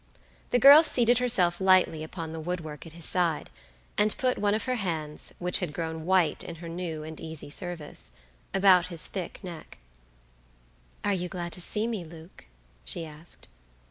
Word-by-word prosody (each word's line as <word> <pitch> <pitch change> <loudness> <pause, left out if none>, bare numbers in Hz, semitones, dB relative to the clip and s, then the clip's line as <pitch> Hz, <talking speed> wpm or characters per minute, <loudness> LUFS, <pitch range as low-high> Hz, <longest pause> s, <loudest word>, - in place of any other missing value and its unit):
The - - +3
girl 280 +5 +10
seated 245 -6 +4
herself 190 -8 +3
lightly 185 -4 +4
upon 160 0 -6
the 160 - -5
wood 175 +2 -3
work 155 0 -8
at 160 - -12
his 170 -2 -7
side, 170 -4 0 0.5
and 210 0 +3
put 255 -1 +1
one 205 0 +2
of 220 - -1
her 255 - -1
hands, 160 -7 -3
which 180 0 +1
had 175 -5 -3
grown 160 0 -4
white 185 -3 +3
in 170 - -7
her 170 +1 -9
new 165 -2 -4
and 160 0 -7
easy 160 -2 -7
service, 150 - -4 0.4
about 190 -2 +5
his 170 -3 -1
thick 185 -3 -6
neck. 170 -4 -9 1.3
"Are 205 - +2
you 180 -1 -2
glad 175 -2 -5
to 180 - -5
see 210 +5 -1
me, 225 -6 -3
Luke?" 160 - -13 0.4
she 110 - -2
asked. 155 +2 -9
175 Hz, 175 wpm, -28 LUFS, 160-195 Hz, 1.3 s, girl